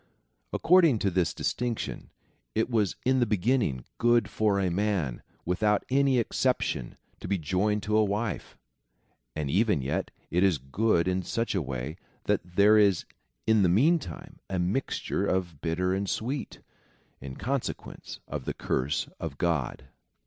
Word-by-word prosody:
According 165 -7 +5
to 100 -2 0
this 90 -2 +1
distinc 120 -2 -2
tion, - - -6 0.5
it 115 - +1
was 105 -5 +1
in 130 +1 +3
the 120 - +2
beginning 105 - +1
good 120 -3 +3
for 105 -2 +2
a 95 -2 +1
man, 90 - -1 0.2
without 105 +4 +1
any 135 -1 +3
exception, 110 - 0 0.2
to - - -7
be 100 +1 +1
joined 95 +6 0
to 105 +1 0
a 110 - +5
wife, 105 +1 -3 0.8
and 75 -2 -2
even 100 - +2
yet, 70 - -2 0.2
it 90 +3 +2
is 95 -5 +4
good 85 - +1
in 95 0 +1
such 115 +6 -2
a 95 - +1
way, 65 +3 -5 0.3
that - - +1
there 105 +2 +6
is 100 -5 +3 0.4
in 110 -1 +4
the 90 - +4
meantime 155 - +1
a 95 - -1
mixture 90 +10 -1
of 85 -6 -1
bitter 90 +3 0
and 100 +1 -1
sweet, 130 +5 -3 0.6
in 65 0 -8
consequence 135 +2 -4
of - - -5
the - - -3
curse 65 +3 -1
of 80 -4 -5
God. 80 -6 -1
100 Hz, 155 wpm, -28 LUFS, 85-115 Hz, 0.8 s, there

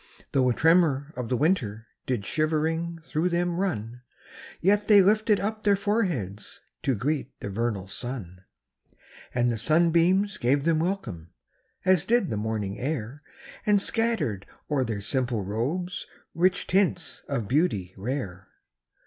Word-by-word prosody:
5 - - -23
Though 130 -2 +3
a - - +3
tremor 160 -3 +3
of 125 -2 -4
the 125 - +1
winter 120 - 0 0.2
Did 120 -6 -1
shivering 160 - 0
through 160 +2 0
them 175 0 0
run; 120 - -2 0.6
Yet 205 +3 +2
they 210 -2 +8
lifted 210 +2 +4
up 215 +2 -2
their 205 -1 +4
foreheads 180 - -2 0.2
To 135 - +1
greet 140 +4 -2
the 100 - -5
vernal 105 -2 -2
sun. 95 -5 -6 0.9
And 120 0 +2
the 115 - -2
sunbeams 170 - +3
gave 140 +4 +2
them 165 -2 +3
welcome. 165 - -3 0.5
As 185 -2 +4
did 230 -3 +2
the - - -1
morning 105 -2 -3
air 130 -1 -3 0.4
And 210 -1 +4
scattered 190 - 0 0.2
o'er 140 -3 +2
their 110 -4 -3
simple 120 -1 -1
robes 140 - -3 0.3
Rich 180 +2 +2
tints 185 -2 +1
of 120 -7 -2
beauty 110 - +1
rare. 100 -4 -4
145 Hz, 140 wpm, -26 LUFS, 115-180 Hz, 0.9 s, they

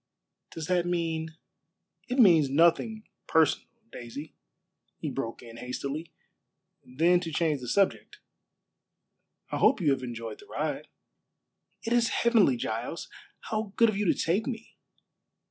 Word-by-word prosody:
"Does 160 - -6
that 175 0 +1
mean 160 -2 -2 0.3
" - - -40
"It 250 - -1
means 170 - +6
nothing 170 +9 +3 0.2
personal, 160 -1 +3 0.2
Daisy," 125 +6 -8 0.6
he - - -4
broke 115 +2 -4
in 115 -1 -11
hastily; 140 +6 -5 0.7
then 165 +7 +3
to 170 -2 -5
change 155 -3 0
the 125 - -7
subject, 195 +9 +1 1.3
"I - - -1
hope 270 - +4
you 155 -6 +3
have 135 -1 0
enjoyed 115 -2 -6
the 410 - -15
ride." - - -3 1.0
"It 230 - -1
is 235 -1 +3
heavenly, 220 - +3
Giles. 115 +8 -4 0.3
How 215 -2 -3
good 230 -1 +5
of 215 - -2
you 205 +1 0
to - - -1
take 185 +9 0
me!" 230 -3 -6
165 Hz, 140 wpm, -28 LUFS, 135-210 Hz, 1.3 s, means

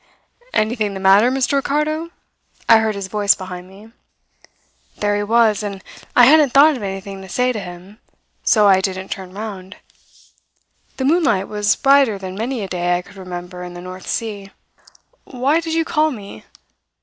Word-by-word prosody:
"'Anything 215 -2 0
the - - -5
matter; 195 +5 +5
Mr. 265 +2 0
Ricardo?' 300 +4 -1 0.6
I 225 - +7
heard 220 -1 -1
his 200 -1 -5
voice 205 0 +2
behind 185 -1 -8
me. 205 +4 -15 1.1
"There 205 0 0
he 205 - -1
was, 220 0 +2
and 200 -2 -6 0.3
I 245 - +8
hadn't 290 -1 +5
thought 295 +2 +6
of 250 - -7
anything 195 0 -6
to 190 - -11
say 250 +6 +1
to 225 - -4
him; 185 +2 -11 0.4
so 210 -2 +4
I 190 -1 +5
didn't 190 0 -4
turn 190 -1 -6
round. 195 -1 -8 1.2
The 265 - -2
moonlight 275 - +2
was 210 -1 +1
brighter 275 -6 +3
than 190 -1 -7
many 230 +3 -3
a - - -4
day 175 -1 0
I 180 - -6
could - - -17
remember 180 -1 -8
in 175 0 -9
the - - -8
North 185 0 -10
Sea. 205 -3 -4 0.8
"'Why 270 +5 0
did 325 -1 -3
you 325 0 +1
call 310 -1 +1
me? 200 - -9
205 Hz, 175 wpm, -19 LUFS, 190-250 Hz, 1.2 s, I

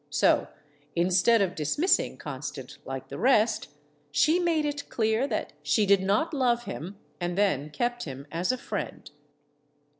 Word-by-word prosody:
So, - - +3 0.5
instead 185 +6 +4
of 185 -2 -1
dismissing 185 - +1
Con 135 -3 -7
stant 140 -2 -7
like 135 0 -6
the 140 - -6
rest, 230 -1 +3 0.4
she 305 - +3
made 330 -3 +1
it 290 -1 -4
clear 220 +3 +1
that - - -3
she 215 - +2
did 200 -1 +4
not 205 - +1
love 245 -4 +2
him 190 -1 -7 0.2
and 175 0 -2
then 155 -8 +1
kept 240 +8 -2
him 135 -1 -7
as 170 +5 0
a 255 - -2
friend. - - -5
200 Hz, 155 wpm, -27 LUFS, 150-245 Hz, 0.5 s, instead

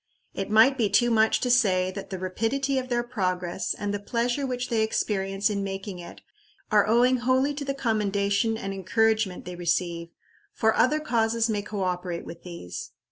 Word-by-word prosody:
It 195 - -4
might 230 +5 +5
be 215 -3 +2
too 240 +4 +3
much 220 -1 +3
to 250 - +1
say 185 -7 +3
that 195 +1 -8
the 190 - -4
rapidity 230 +9 -1
of 255 0 -6
their 240 -1 +1
progress 185 -6 -2
and 205 0 -3
the 205 - -2
pleasure 240 +6 -1
which 250 0 -3
they 230 -3 +1
experience 195 -2 0
in 200 -2 -1
making 195 -1 -5
it, 175 - -11 0.5
are 210 -1 +4
owing 245 +3 +4
wholly 260 +3 +1
to 285 0 -5
the 275 0 -3
commendation 210 -2 0
and 195 -3 -4
encouragement 215 +1 0
they 180 0 -6
receive 170 -1 -1 0.5
for 220 0 +2
other 300 +4 +3
causes 230 -4 +1
may 205 -1 -1
co 205 -1 -4
operate 180 -1 -3
with 170 - -9
these. 170 - -8
215 Hz, 185 wpm, -26 LUFS, 190-240 Hz, 0.5 s, might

